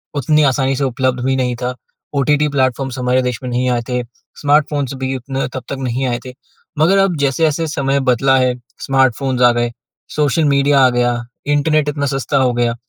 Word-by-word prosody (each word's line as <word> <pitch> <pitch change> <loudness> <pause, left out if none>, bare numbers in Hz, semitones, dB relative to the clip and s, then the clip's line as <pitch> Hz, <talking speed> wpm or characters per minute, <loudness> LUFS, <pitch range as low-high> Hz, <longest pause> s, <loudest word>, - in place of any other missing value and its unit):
उतनी 150 +2 +2
आसानी 135 0 +1
से 140 - -2
उपलब्ध 130 -1 -1
भी 135 0 +1
नहीं 125 -2 -1
था। 125 0 -2 0.4
ओटीटी 150 +2 +2
प्लेटफ़ॉर्म्स 130 0 0
हमारे 125 +1 +2
देश 125 -1 -2
में 125 - -4
नहीं 125 +1 0
आए 120 -1 0
थे। 125 -1 -1 0.4
स्मार्टफोन्स 145 -2 +1
भी 130 0 -1
उतना 135 +2 -3
तब 130 - -5
तक 140 - -3
नहीं 130 0 -2
आए 120 -1 -1
थे। 125 - -8 0.5
मगर 175 +6 +4
अब 195 -3 +2
जैसे-जैसे 155 +3 +1
समय 140 0 +1
बदला 135 +2 +3
है 130 -1 +2 0.3
स्मार्टफोन्स 135 -1 +1
आ 120 -1 +6
गए, 120 0 -1 0.4
सोशल 150 +1 +1
मीडिया 140 0 +3
आ - - +5
गया, 120 0 +1 0.3
इंटरनेट 150 +1 +2
इतना 145 -1 -2
सस्ता 135 +1 -1
हो 130 -2 +2
गया, 120 -1 0
135 Hz, 190 wpm, -17 LUFS, 125-145 Hz, 0.5 s, आ